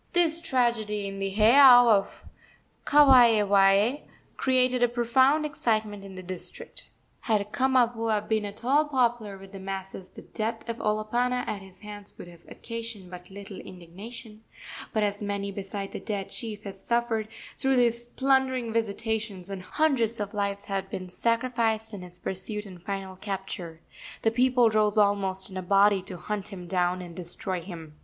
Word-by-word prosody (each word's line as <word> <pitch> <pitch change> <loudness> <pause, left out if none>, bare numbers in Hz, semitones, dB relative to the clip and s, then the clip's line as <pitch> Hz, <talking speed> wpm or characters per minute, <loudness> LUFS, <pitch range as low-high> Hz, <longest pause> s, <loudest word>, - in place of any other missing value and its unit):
This 335 -1 +3
tragedy 225 -8 0
in 195 0 -6
the 195 0 -1
heiau 245 +4 +7
of 205 -4 +4 0.8
Kawaewae 225 -5 +5 0.3
created 255 -1 +2
a 245 - +5
profound 260 +5 +3
excitement 215 -7 -1
in 195 -1 -10
the 185 - -8
district. 180 -1 -8 0.4
Had 210 -3 0
Kamapuaa 230 -5 +1
been 220 -1 +1
at 205 +3 -8
all 290 +4 +4
popular 240 -6 0
with 195 0 -13
the 195 - -9
masses 190 -1 -6
the - - -12
death 225 +2 -4
of 230 0 -3
Olopana 235 +4 0
at 200 - -3
his 190 -1 -14
hands 205 -1 -10
would - - -10
have 170 -1 -15
occasioned 230 -5 -7
but 180 0 -10
little 200 0 -9
indignation; 210 +6 -11 0.5
but 215 - +1
as 205 0 -1
many 200 -1 -3
beside 195 0 -6
the - - -5
dead 200 -3 -4
chief 215 -4 -5
had 200 - -6
suffered 225 +2 -1 0.3
through 265 -1 +1
his 240 -1 +2
plundering 260 -3 +1
visitations, 220 -3 -2
and 195 -1 -5
hundreds 235 -1 0
of 205 0 -4
lives 200 -1 -2
had 195 -1 -3
been 185 -1 -6
sacrificed 230 0 0
in 200 - -6
his 180 0 -4
pursuit 200 +4 -4
and 185 -3 -11
final 190 0 -5
capture, 190 -4 -6 0.4
the 225 - +3
people 245 -1 +3
rose 215 0 +2
almost 200 -2 +2
in 185 - -6
a - - -2
body 195 +1 +4
to 185 -1 -7
hunt 210 +1 -4
him 185 -4 -8
down 180 0 0
and 170 -1 -10
destroy 180 +1 -4
him. 165 -4 -10
210 Hz, 165 wpm, -27 LUFS, 195-235 Hz, 0.8 s, heiau